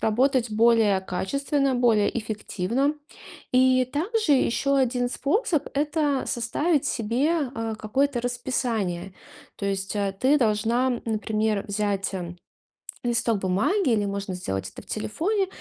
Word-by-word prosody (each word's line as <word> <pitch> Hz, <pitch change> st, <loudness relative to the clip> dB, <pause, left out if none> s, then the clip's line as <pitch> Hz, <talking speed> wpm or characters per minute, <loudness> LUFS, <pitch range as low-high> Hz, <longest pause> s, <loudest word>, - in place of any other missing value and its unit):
работать 245 Hz, +2 st, +2 dB
более 220 Hz, -3 st, +4 dB
качественно, 275 Hz, -, -1 dB
более 235 Hz, -3 st, +2 dB
эффективно. 220 Hz, +5 st, -1 dB, 0.6 s
И 255 Hz, 0 st, +4 dB
также 365 Hz, +2 st, +1 dB
ещё 275 Hz, +1 st, +2 dB
один 245 Hz, -2 st, +1 dB
способ- 310 Hz, -, 0 dB
это 295 Hz, -1 st, +1 dB
составить 285 Hz, +6 st, 0 dB
себе, 265 Hz, +6 st, 0 dB
а, 225 Hz, -1 st, -3 dB
какое-то 245 Hz, +4 st, 0 dB
расписание. 235 Hz, -7 st, -2 dB, 0.4 s
То 200 Hz, -, -4 dB
есть, 195 Hz, +1 st, -2 dB
а, 200 Hz, -1 st, 0 dB
ты 265 Hz, +9 st, +2 dB
должна, 230 Hz, +2 st, +1 dB
м, 245 Hz, -, -2 dB
например, 215 Hz, -2 st, -1 dB
взять, 200 Hz, -1 st, -1 dB
м, 175 Hz, -1 st, -6 dB, 0.7 s
листок 235 Hz, -2 st, +1 dB
бумаги, 215 Hz, -, +1 dB
или 210 Hz, -2 st, +2 dB
можно 200 Hz, -1 st, -3 dB
сделать 95 Hz, -, -3 dB
это -, -, -10 dB
в -, -, -22 dB
телефоне, 375 Hz, -, -1 dB
235 Hz, 125 wpm, -25 LUFS, 205-275 Hz, 0.7 s, более